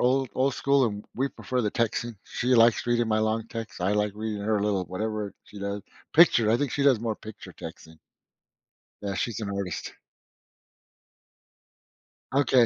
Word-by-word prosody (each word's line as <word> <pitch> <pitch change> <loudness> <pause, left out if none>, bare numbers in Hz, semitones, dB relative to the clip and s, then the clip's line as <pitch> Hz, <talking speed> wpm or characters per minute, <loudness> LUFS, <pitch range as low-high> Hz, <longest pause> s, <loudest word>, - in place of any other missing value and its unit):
old 130 +1 +2
old 130 0 +2
school, 140 +1 +3
and 105 -2 -4
we 135 +3 0
prefer 130 -2 -3
the 105 - 0
texting. 115 +1 -1
She 125 +1 0
likes 115 0 +5
reading 120 -1 +2
my 110 0 +2
long 110 +1 0
text. 115 -4 -6
I 95 +3 +2
like 105 0 +1
reading 105 -1 -3
her 110 +1 +1
a - - -1
little 100 -3 +1
whatever 105 +2 -3
she 105 - -12
does, 100 0 -3 0.3
picture, 135 -10 +6
I 115 - +5
think 140 0 -1
she 140 - 0
does 140 -4 +5
more 115 -1 -1
picture 110 -1 -10
texting. 80 0 -10 1.0
Yeah, 100 -1 -2
she's 115 +3 -2
an 105 -2 -3
artist. 100 -2 -4 2.4
Ok. 140 -2 +2
110 Hz, 170 wpm, -27 LUFS, 105-125 Hz, 2.4 s, picture